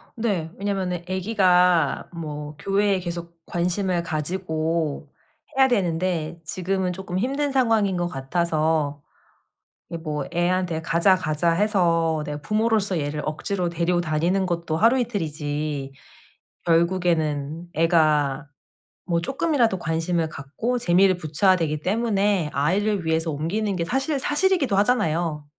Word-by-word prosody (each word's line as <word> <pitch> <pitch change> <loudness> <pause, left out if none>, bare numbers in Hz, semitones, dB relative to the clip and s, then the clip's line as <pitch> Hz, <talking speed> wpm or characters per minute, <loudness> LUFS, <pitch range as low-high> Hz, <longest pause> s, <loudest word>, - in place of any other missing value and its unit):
네. 200 -8 -1
왜냐면은 190 -3 -2
애기가 185 -3 +2
뭐 150 -2 -6
교회에 200 +1 +1
계속 170 -1 -6
관심을 180 0 -1
가지고 160 -2 -2 0.5
해야 265 0 +6
되는데 170 -6 -1
지금은 185 +2 -1
쪼끔 185 0 -5
힘든 275 +5 0
상황인 225 -8 +2
것 175 0 0
같아서 155 0 -1 0.9
이 170 - -4
뭐 150 -3 -3
애한테 175 -1 0
가자 170 +3 +4
가자 165 -1 0
해서 165 -5 +2
내가 150 0 -5
부모로서 215 -1 +1
얘를 150 0 -3
억지로 180 +4 -2
데리고 170 +1 0
다니는 170 +4 0
것도 170 -3 -2
하루 230 +8 +4
이틀이지 150 - -3 0.7
결국에는 165 -3 +1
애가 155 -4 +2 0.6
뭐 170 -2 +1
쪼끔이라도 255 - +1
관심을 165 0 -1
갖고 155 - -3
재미를 185 -3 +4
붙여야 170 +4 +2
되기 160 -4 -1
때문에 205 -5 +1
아이를 190 +7 +1
위해서 160 0 +1
옮기는 190 +7 -2
게 170 - -1
사실 270 - -1
사실이기도 295 - +1
하잖아요. 165 -9 +1
175 Hz, 290 characters per minute, -24 LUFS, 160-195 Hz, 0.9 s, 해야